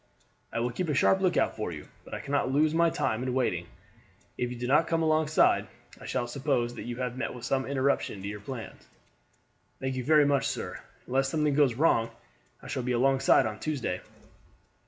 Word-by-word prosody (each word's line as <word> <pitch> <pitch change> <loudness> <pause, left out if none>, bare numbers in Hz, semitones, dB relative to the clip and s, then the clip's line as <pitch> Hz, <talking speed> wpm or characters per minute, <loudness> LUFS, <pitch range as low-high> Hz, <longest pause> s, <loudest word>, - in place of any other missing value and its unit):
I 115 - -2
will 120 +1 0
keep 170 +7 -3
a 150 - +1
sharp 190 +7 +4
lookout 185 -2 +2
for 110 -5 -3
you, 75 -2 -8 0.2
but - - -7
I - - -5
cannot 140 -2 0
lose 150 +3 +3
my 170 +1 +4
time 110 -7 -1
in 130 0 -2
waiting. 90 -10 0 0.7
If 125 - -2
you 125 - -6
do 120 - -4
not 150 +6 +3
come 165 -1 +1
alongside 155 -1 +3 0.3
I - - -10
shall 125 -2 -1
suppose 125 -2 -1
that - - -8
you 120 0 -4
have 125 -1 -3
met 130 - -3
with 120 - -7
some 135 -1 0
interruption 135 -7 0
to - - -4
your 105 0 -5
plans." 115 +2 -8 0.9
"Thank 130 0 -2
you 130 -1 -3
very 150 +1 +5
much, 140 -1 +2
sir. - - -4 0.3
Unless 135 +1 +1
something 150 -1 +1
goes 140 -4 +3
wrong 115 -5 +3 0.5
I - - -9
shall - - -2
be 125 0 -1
alongside 135 +1 +4
on 110 -1 -4
Tuesday." 135 -12 -2
130 Hz, 200 wpm, -28 LUFS, 120-150 Hz, 0.9 s, very